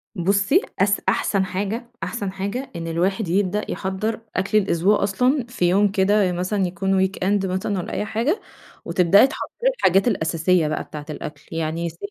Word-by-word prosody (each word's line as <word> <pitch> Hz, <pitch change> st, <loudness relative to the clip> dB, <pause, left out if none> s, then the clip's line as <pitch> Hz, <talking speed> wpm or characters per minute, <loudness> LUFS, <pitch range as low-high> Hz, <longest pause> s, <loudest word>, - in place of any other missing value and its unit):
بُصي 200 Hz, -, +2 dB, 0.2 s
أس 200 Hz, +1 st, +2 dB
أحسن 195 Hz, -2 st, +1 dB
حاجة 205 Hz, +6 st, -4 dB
أحسن 205 Hz, -4 st, -3 dB
حاجة 200 Hz, +8 st, -4 dB
إن 165 Hz, -1 st, -5 dB
الواحد 185 Hz, +5 st, 0 dB
يبدأ 200 Hz, +3 st, 0 dB
يحضر 200 Hz, +4 st, -2 dB, 0.2 s
أكل 195 Hz, +3 st, +1 dB
الأسبوع 195 Hz, 0 st, +2 dB
أصلًا 250 Hz, +7 st, +1 dB
في 240 Hz, -7 st, -1 dB
يوم 200 Hz, +2 st, +3 dB
كده 195 Hz, -1 st, +3 dB
مثلًا 185 Hz, +3 st, -1 dB
يكون 190 Hz, +2 st, +1 dB
weekend 195 Hz, +1 st, -1 dB
مثلًا 190 Hz, +2 st, -2 dB
والّا 180 Hz, -, -4 dB
أي -, -, -1 dB
حاجة 235 Hz, -, -1 dB, 0.4 s
وتبدأي 190 Hz, +7 st, +5 dB
تحضري 475 Hz, -, -2 dB
الحاجات 195 Hz, -, +3 dB
الأساسية 165 Hz, -4 st, +1 dB
بقى 155 Hz, -, -2 dB
بتاعة 150 Hz, -1 st, -9 dB
الأكل 150 Hz, -1 st, -7 dB
يعني 165 Hz, +1 st, -2 dB
س 165 Hz, -, -14 dB
195 Hz, 160 wpm, -22 LUFS, 180-210 Hz, 0.4 s, وتبدأي